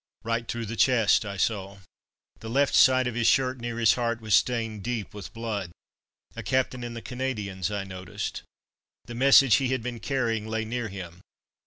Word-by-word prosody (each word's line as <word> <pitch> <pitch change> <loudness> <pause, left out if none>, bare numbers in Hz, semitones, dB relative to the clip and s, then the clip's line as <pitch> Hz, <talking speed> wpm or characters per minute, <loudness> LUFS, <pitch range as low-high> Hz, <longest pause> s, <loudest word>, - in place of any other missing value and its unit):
Right 115 0 -2
through 115 -1 -3
the 115 +2 -5
chest, 115 -3 +3
I 100 0 -5
saw. 100 -1 -1 0.6
The 110 - -8
left 140 +4 +2
side 130 0 +5
of 125 - -2
his 120 0 +1
shirt, 130 -1 +2
near 120 0 -4
his 115 -2 +5
heart, 115 -1 -1
was 110 -2 -2
stained 115 -1 +1
deep 115 -2 -4
with 105 -2 -8
blood. 110 -5 -4 0.7
A - - -5
captain 130 -1 -1
in 120 -1 -6
the 115 - -7
Canadians, 105 -8 -3
I 100 -1 -3
noticed. 95 -1 -6 0.6
The 120 - -8
message 135 0 +6
he 135 - 0
had 130 -2 -1
been 120 -1 -5
carrying 115 -3 -1
lay 110 0 -2
near 120 +1 -3
him. 90 -3 -9
115 Hz, 185 wpm, -26 LUFS, 105-125 Hz, 0.7 s, message